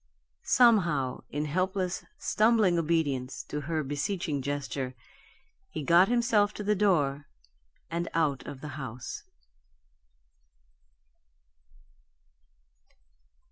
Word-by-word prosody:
Somehow, 175 - +3
in 150 +1 -2
helpless, 185 +3 -1
stumbling 215 -5 +3
obedience 150 -6 -1
to 150 - -5
her 155 +1 -2
beseeching 145 +1 -2
gesture, 135 -1 -3 0.7
he 155 - -5
got 170 +5 +6
himself 230 -4 +2
to 210 - -5
the 210 +1 +2
door 150 -9 +1 0.6
and 170 +1 -2
out 150 -5 +1
of 135 -2 -8
the 150 - -6
house. 125 -1 -6
165 Hz, 90 wpm, -29 LUFS, 140-195 Hz, 0.7 s, got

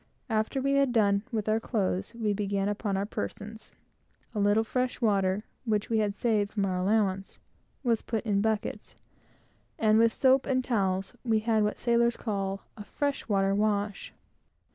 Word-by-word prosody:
After 220 +4 0
we 275 +1 0
had 275 -2 +3
done 200 -4 +3
with 220 -3 -2
our 215 +1 +2
clothes, 210 -1 -2
we 220 -3 0
began 200 -1 -1
upon 205 -1 -1
our - - 0
own 205 - -7
persons. 210 - -6 0.6
A 215 - -2
little 205 +2 +3
fresh 250 +3 -2
water, 200 -3 +1 0.2
which 215 -2 -1
we 225 - +3
had 205 -2 0
saved 210 -3 0
from 200 -2 0
our 185 -1 -1
allowance, 195 -1 0 0.5
was 230 -3 +2
put 225 -1 -3
in 200 -2 +2
buckets, 220 -1 -2 0.8
and 215 0 +4
with 230 0 +5
soap 260 +2 +3
and 255 -1 +1
towels, 195 -5 -1
we 225 -3 +2
had 220 -1 +2
what 210 0 0
sailors 235 0 +2
call 195 -3 -3
a 210 - -8
fresh 285 +4 -3
water 195 -1 +2
wash. 205 0 -1
215 Hz, 170 wpm, -28 LUFS, 200-230 Hz, 0.8 s, with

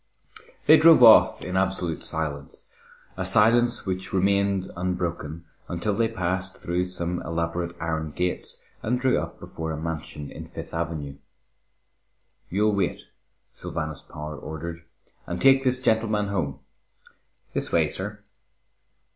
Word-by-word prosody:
They 155 - +8
drove 160 -5 +7
off 115 -2 +7
in 90 - -4
absolute 95 -3 0
silence, 75 -3 -4 0.5
a 95 - -3
silence 115 +5 +4
which 95 -1 -3
remained 100 0 +1
unbroken 85 -3 -3 0.2
until 90 +5 -1
they 115 +2 +2
passed 95 -2 -2
through 90 +1 -1
some 90 -1 -3
elaborate 85 +1 -3
iron 80 -1 -2
gates 90 +5 -3 0.2
and 125 +3 0
drew 130 0 +2
up - - -6
before 80 0 -5
a 80 - -3
mansion 75 -2 -5
in - - -9
Fifth - - -9
Avenue. 80 -4 -4 1.3
"You'll 105 +3 +2
wait," 100 -3 -2 0.4
Sylvanus 80 -3 -5
Power 75 0 -8
ordered, 80 +4 -7 0.4
"and 90 0 -3
take 135 0 +5
this 130 -1 +2
gentleman 110 -4 +1
home. 85 -9 -2 0.9
This - - -2
way, - - +3
sir." - - -6
90 Hz, 130 wpm, -25 LUFS, 80-105 Hz, 1.3 s, They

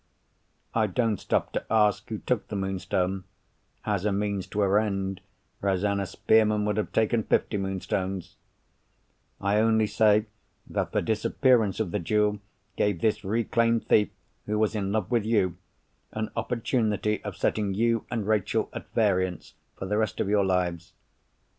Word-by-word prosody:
I 110 -2 +2
don't 110 +1 0
stop - - -1
to - - -1
ask 105 -2 +2
who 110 - -3
took 120 +1 -2
the 105 - -5
Moonstone 95 -1 -1 0.6
(as 100 -3 0
a 105 - +1
means 100 -1 -1
to 105 - -2
her 100 +1 +4
end, 95 -3 -2 0.4
Rosanna 100 0 0
Spearman 110 0 +2
would 105 -1 0
have 105 - -1
taken 110 +1 +2
fifty 105 - 0
Moonstones)—I 95 +1 -5
only 110 0 +3
say 105 0 +3 0.4
that - - -2
the - - 0
disappearance 110 -1 +2
of 105 -6 -1
the 105 - -1
jewel 105 +3 +1 0.4
gave 100 -5 +1
this 110 -2 +1
reclaimed 115 +2 +1
thief 105 - +4 0.4
who 105 0 0
was 110 0 +1
in 100 -2 -2
love 110 0 -1
with 120 -3 +2
you, 105 -6 +1 0.6
an 110 0 -3
opportunity 110 -3 0
of 105 -5 -6
setting 100 -3 0
you 115 +1 +1
and 110 -4 -2
Rachel 110 -3 0
at - - -8
variance 95 -5 0 0.2
for - - -5
the 105 +3 0
rest 110 -2 -1
of - - 0
your 100 0 +3
lives. 90 -3 -1
105 Hz, 155 wpm, -27 LUFS, 95-110 Hz, 0.6 s, her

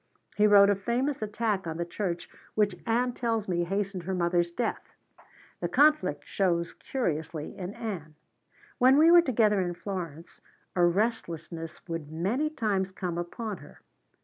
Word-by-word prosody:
He 210 0 +5
wrote 200 -1 +7
a - - +2
famous 245 +8 -1
attack 210 -3 -1
on 160 0 -4
the 170 - -2
church 175 -1 -3 0.3
which 205 -3 +2
Ann 245 +2 +1
tells 230 -4 -1
me 175 -2 0
hastened 195 0 -2
her 185 +2 -3
mother's 175 -1 +1
death. 230 +7 -4 0.6
The - - -1
conflict 255 - +3
shows 170 -3 0
curiously 160 - -3
in 195 0 -6
Ann. 170 -9 -6 0.6
When 260 +2 +6
we 320 +3 +7
were 345 0 +9
together 215 - +2
in 175 -1 -2
Florence 170 -4 -6 0.3
a 175 - +3
restlessness 170 -5 -1
would 165 -3 -5
many 210 - 0
times 205 -10 -1
come 180 -2 -3
upon 205 +4 -4
her. 145 - -15
195 Hz, 150 wpm, -28 LUFS, 170-225 Hz, 0.6 s, were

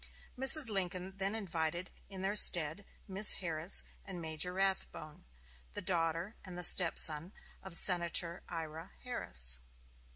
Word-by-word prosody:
Mrs. 270 +3 +8
Lincoln 190 -2 -6
then 195 +2 -6
invited 175 -3 -8 0.2
in 190 -1 -12
their 195 +2 -5
stead 170 -2 +1 0.2
Miss 195 +2 +5
Harris 165 0 -1 0.2
and 190 -3 -12
Major 160 +2 -5
Rathbone, 190 - -6 0.5
the - - -9
daughter 170 +3 -5
and 185 -2 -14
the 180 - -7
stepson 165 0 +4 0.3
of 190 -3 -3
Senator 170 -1 -1
Ira 165 +1 -11
Harris. 60 - -2
180 Hz, 125 wpm, -30 LUFS, 165-195 Hz, 0.5 s, Mrs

